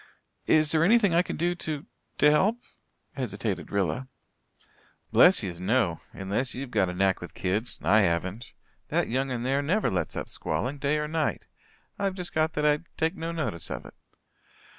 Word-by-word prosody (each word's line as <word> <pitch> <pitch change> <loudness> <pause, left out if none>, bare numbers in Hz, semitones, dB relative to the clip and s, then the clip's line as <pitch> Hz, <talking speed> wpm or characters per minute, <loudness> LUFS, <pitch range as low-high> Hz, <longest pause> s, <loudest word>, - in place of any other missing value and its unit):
"Is 155 -1 +4
there 160 0 +3
anything 205 -1 +4
I 170 - +5
can - - -5
do 175 +2 +1
to 155 -4 -4 0.3
to 150 +1 +6
help?" 200 +10 +3 0.6
hesitated 105 -5 -3
Rilla. 100 +6 -1 1.0
"Bless 180 - +6
yez, 90 -3 -5
no 95 -4 +1
unless 105 +6 -2
ye've 125 -2 -6
a 95 -4 +2
knack 95 0 +1
with 90 - -9
kids. 105 +6 -2
I 105 +7 +5
haven't. 95 +5 -1 0.3
That - - 0
young 130 +3 0
un 120 -2 -3
there 135 +2 +1
never 185 +9 +1
lets 90 -3 -1
up - - -4
squalling, 140 +3 -3
day 145 +2 +1
or 150 0 -1
night. 155 -1 -1 0.5
I've 195 -2 0
just 180 -2 -6
got 155 0 +1
that 150 -1 -1
I 150 0 +4 0.2
take 160 +1 0
no 165 +1 -4
notice 155 - -2
of - - -5
it." - - -12
135 Hz, 175 wpm, -27 LUFS, 100-160 Hz, 1.0 s, to